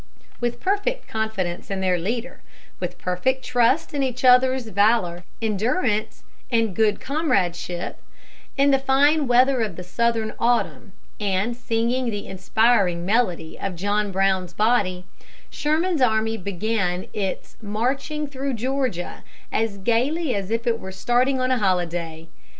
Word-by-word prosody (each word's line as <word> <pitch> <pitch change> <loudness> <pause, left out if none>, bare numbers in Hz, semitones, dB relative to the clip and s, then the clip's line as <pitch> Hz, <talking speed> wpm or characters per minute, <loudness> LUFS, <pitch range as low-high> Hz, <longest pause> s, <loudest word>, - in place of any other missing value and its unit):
With 240 -1 -2
perfect 410 +6 -1
confidence 220 -6 -3
in 195 -1 -2
their 185 -2 +1
leader, 235 +8 -4 0.4
with - - -4
perfect 255 +9 -1
trust 255 +6 +2
in 285 - 0
each 255 -1 -1
others' 255 -1 +5
valor, 200 -4 +2 0.2
endurance 215 - 0 0.3
and 225 -5 +1
good 215 -2 +2
comradeship, 185 - -1 0.6
in 280 +1 +4
the 270 - +4
fine 280 +2 +3
weather 250 +1 +4
of 210 -6 -2
the 180 - -7
Southern 225 +3 0
autumn, 235 -3 0 0.3
and 205 +3 0
singing 240 +1 0
the 205 -2 -4
inspiring 190 -2 +2
melody 185 -7 0
of 195 -2 -3
"John 205 +3 0
Brown's 190 -2 +1
Body," 200 -5 +1 0.5
Sherman's 315 +1 0
army 225 -2 +2
began 195 -1 -2
its 195 -3 -4
"marching 265 +8 -2
through 275 -2 -3
Georgia" 250 -6 -2 0.3
as 220 -3 0
gaily 255 - +1
as 200 -1 -3
if 230 +2 -1
it 230 -1 +1
were 190 - -7
starting 245 +7 +1
on 255 0 +1
a 255 - +2
holiday. 170 -4 -1
225 Hz, 135 wpm, -23 LUFS, 190-255 Hz, 0.6 s, others